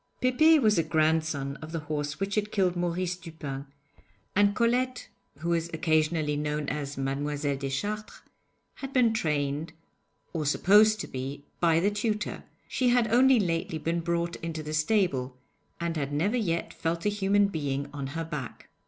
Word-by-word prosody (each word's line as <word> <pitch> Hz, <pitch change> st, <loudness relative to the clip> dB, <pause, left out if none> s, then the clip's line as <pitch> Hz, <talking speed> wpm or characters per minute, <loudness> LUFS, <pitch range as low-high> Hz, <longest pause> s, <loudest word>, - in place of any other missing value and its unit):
Pépé 310 Hz, +6 st, +5 dB
was 215 Hz, -7 st, +3 dB
a -, -, +3 dB
grandson 155 Hz, -3 st, 0 dB
of 155 Hz, +1 st, -9 dB
the 165 Hz, -1 st, -3 dB
horse 150 Hz, 0 st, -3 dB
which 195 Hz, +1 st, -2 dB
had 210 Hz, 0 st, 0 dB
killed 185 Hz, -3 st, +1 dB
Maurice 175 Hz, +1 st, -1 dB
Dupin, 155 Hz, -5 st, -7 dB, 0.7 s
and 205 Hz, 0 st, +4 dB
Colette 250 Hz, +2 st, 0 dB, 0.3 s
(who 170 Hz, -, -2 dB
was 170 Hz, 0 st, 0 dB
occasionally 155 Hz, -2 st, +1 dB
known 150 Hz, 0 st, -2 dB
as 145 Hz, -1 st, -4 dB
Mademoiselle 140 Hz, +1 st, -1 dB
Deschartres) 205 Hz, +11 st, -4 dB, 0.6 s
had 270 Hz, 0 st, -7 dB
been 240 Hz, -4 st, +4 dB
trained 150 Hz, -4 st, -1 dB, 0.6 s
or 160 Hz, -3 st, -1 dB
supposed 210 Hz, +8 st, +5 dB
to -, -, -5 dB
be 135 Hz, +2 st, -6 dB
by 165 Hz, -2 st, +4 dB
the 200 Hz, +4 st, +2 dB
tutor; 210 Hz, 0 st, -2 dB, 0.2 s
she 255 Hz, -1 st, +1 dB
had 240 Hz, -2 st, +3 dB
only 260 Hz, 0 st, +6 dB
lately 165 Hz, -4 st, -1 dB
been 165 Hz, +2 st, -1 dB
brought 170 Hz, 0 st, -1 dB
into 160 Hz, -2 st, -5 dB
the 155 Hz, 0 st, -5 dB
stable, 155 Hz, -7 st, +1 dB, 0.4 s
and 170 Hz, -1 st, -2 dB
had 140 Hz, -1 st, -2 dB
never 175 Hz, +11 st, +1 dB
yet 170 Hz, -8 st, -1 dB
felt 165 Hz, +2 st, -2 dB
a -, -, +4 dB
human 205 Hz, 0 st, +2 dB
being 145 Hz, -6 st, -2 dB
on 140 Hz, -2 st, -4 dB
her 165 Hz, +4 st, -4 dB
back. 150 Hz, -6 st, -7 dB
165 Hz, 160 wpm, -28 LUFS, 150-205 Hz, 0.7 s, only